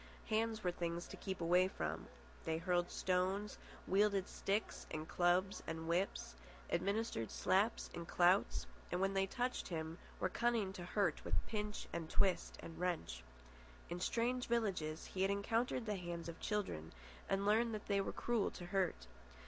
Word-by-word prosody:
Hands 220 0 +1
were 180 - +2
things 170 0 -2
to - - -6
keep 190 -3 -4
away 180 +2 +5
from. 80 - -3 0.4
They 160 0 0
hurled 175 +1 +1
stones, 190 +3 0 0.3
wielded 200 0 +3
sticks 205 +3 -1
and 155 0 -4
clubs 180 +2 +2
and 160 0 -3
whips, 170 - 0 0.4
administered 195 - 0
slaps 205 +5 +2
and 170 -1 -5
clouts, 180 +3 +4 0.3
and, 180 - +1
when 195 +1 +2
they 195 0 +2
touched 245 +5 -1
him, 160 -1 -4 0.2
were - - +2
cunning 225 -1 +1
to 185 -3 -6
hurt 180 -3 +1
with 85 -1 0
pinch 210 -1 -3
and 165 -1 -3
twist 190 +1 +2
and 165 - -8
wrench. 175 - -1 0.7
In 175 - -2
strange 245 +6 +1
villages 190 -10 0
he 185 - -4
had 195 - +4
encountered 225 +4 +1
the 210 - 0
hands 175 -2 -4
of 170 - -6
the - - -14
children 190 - -2 0.4
and 195 +1 +1
learned 225 +3 +4
that 210 - -6
they 200 -1 +2
were - - -2
cruel 235 -3 +1
to 175 - -8
hurt. 180 - 0
185 Hz, 165 wpm, -39 LUFS, 170-210 Hz, 0.7 s, away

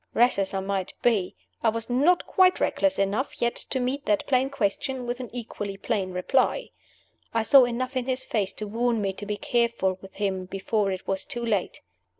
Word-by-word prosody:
Rash 240 -3 +4
as 195 -1 0
I 190 - 0
might 195 -1 -2
be, 215 -7 +2 0.3
I 230 - +4
was 225 +1 -3
not 290 +9 +3
quite 370 -1 +4
reckless 290 -1 +1
enough 200 +7 -1
yet 235 0 +1
to 260 - -4
meet 260 +3 -2
that 210 -1 +2
plain 260 0 +2
question 255 +1 -2
by 240 - -1
an 250 -3 -6
equally 210 -4 -5
plain 200 -3 -1
reply. 260 - +1 0.6
I 225 - +3
saw 265 +2 +7
enough 255 +2 -3
in 255 -1 -1
his 260 0 -1
face 205 -4 -1
to 215 - -5
warn 230 +2 0
me 195 -2 -1
to 205 +2 -8
be 210 0 -2
careful 230 -5 0
with 195 0 -13
him 190 -2 -1
before 195 +2 -1
it 185 -1 -5
was 195 0 0
too 240 0 -4
late. 210 -5 -1
230 Hz, 200 wpm, -26 LUFS, 195-255 Hz, 0.6 s, saw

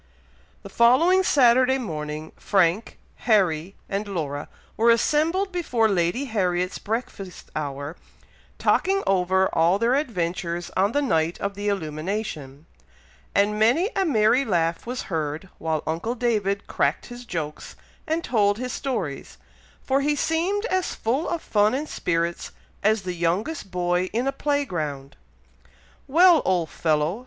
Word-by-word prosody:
The - - -9
following 320 +11 +4
Saturday 260 -5 +4
morning, 155 - -5
Frank, 190 +2 +1 0.3
Harry, 185 -4 +2
and 200 +2 -3
Laura 150 -7 -4 0.3
were 230 +2 +3
assembled 315 - +2
before 250 -11 +1
Lady 190 +6 0
Harriet's 185 -6 -1
breakfast 205 -4 -5
hour, 145 +1 -4 0.6
talking 390 +1 +2
over 190 0 +2
all 170 +3 +3
their 230 +4 +2
adventures 175 - -2
on 200 +4 +2
the 290 - +1
night 165 - 0
of 200 0 -2
the 205 +1 -5
illumination; 155 -5 -4 0.7
and 210 +1 +2
many 285 - +3
a 390 - +2
merry 245 - +3
laugh 170 -5 -1
was 250 +1 -3
heard 160 +1 -4
while 160 -2 -2
uncle 170 +10 -2
David 210 -5 0
cracked - - 0
his 245 0 -9
jokes 160 -9 -6 0.3
and 320 +2 -1
told 205 -3 +2
his 250 +1 -4
stories, 225 - -4 0.5
for 270 +1 +1
he 295 +1 +1
seemed 350 +8 0
as 370 -6 -1
full 260 +9 -1
of 340 -2 -3
fun 210 +2 +2
and 295 +3 -3
spirits 170 - -2 0.3
as 215 0 +2
the 180 -1 -3
youngest 185 - -2
boy 180 0 0
in 240 +3 0
a 275 - +1
play 285 0 0
ground. 145 - -5 0.9
"Well, 340 +3 +6
old 175 -4 0
fellow!" 155 +5 0
205 Hz, 140 wpm, -24 LUFS, 170-255 Hz, 0.9 s, Well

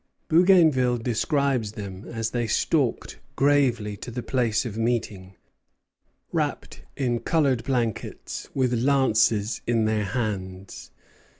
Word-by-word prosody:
Bougainville 160 -8 +4
describes 125 -1 0
them 100 -1 -8
as 115 -1 -4
they 120 -1 -1
stalked - - 0 0.2
gravely 125 -7 +2
to - - -8
the 120 0 -5
place 120 -3 0
of 110 -4 -5
meeting, 110 -5 -2 1.0
wrapped - - -3 0.2
in 120 -3 0
colored 140 -7 +1
blankets, 120 -4 -3
with 130 -2 +1
lances 115 -4 +2
in 115 -2 +2
their 110 -1 0
hands. 95 -4 -4
120 Hz, 110 wpm, -25 LUFS, 110-130 Hz, 1.0 s, Bougainville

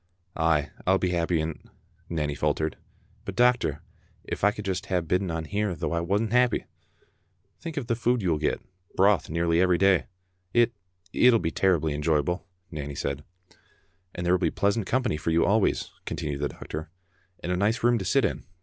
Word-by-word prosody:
"Ay, 80 -3 +1 0.2
I'll 95 +1 +5
be 90 -1 0
happy 85 -1 +1
in't," 80 0 -4 0.5
Nanny 75 -3 -1
faltered, 75 +1 -1 0.5
"but, - - -6
doc 125 0 +5
tor, 75 -1 -3 0.4
if - - -5
I 105 - +7
could 105 0 -6
just 95 +1 -2
hae 95 -2 +1
bidden 90 +3 0
on 80 -1 -3
here 105 +1 -1
though - - -3
I 85 - +1
wasna 100 +5 0
happy!" 125 -1 +3 0.5
" 95 +1 -44
Think 165 -2 -6
of 140 - -1
the 115 0 0
food 120 0 +1
you 90 - +2
will 75 - +1
get; 75 - 0 0.3
broth 95 -3 +3
nearly 85 +1 +2
every 90 -1 +4
day." 95 -1 +3 0.2
" 90 0 -44
It 120 0 +4 0.2
— 90 +1 -35
it'll 125 -2 +6
be 85 -6 -2
terrible 90 -5 +2
enjoyable," 75 +4 0 0.2
Nanny 70 -1 -5
said. 70 +1 -3 0.5
" 90 +1 -36
And 90 - -4
there 90 - +3
will 90 - +3
be - - +2
pleasant 100 +1 0
company 125 -10 +1
for 80 - -3
you 80 +1 +3
always," 105 0 +2
continued 70 -2 -3
the 75 - 0
doctor, 75 0 -7 0.5
"and 90 - -2
a - - +2
nice 105 +6 +1
room 120 -1 +4
to 95 - -4
sit 135 +6 +3
in. - - -2
90 Hz, 205 wpm, -27 LUFS, 80-105 Hz, 0.5 s, I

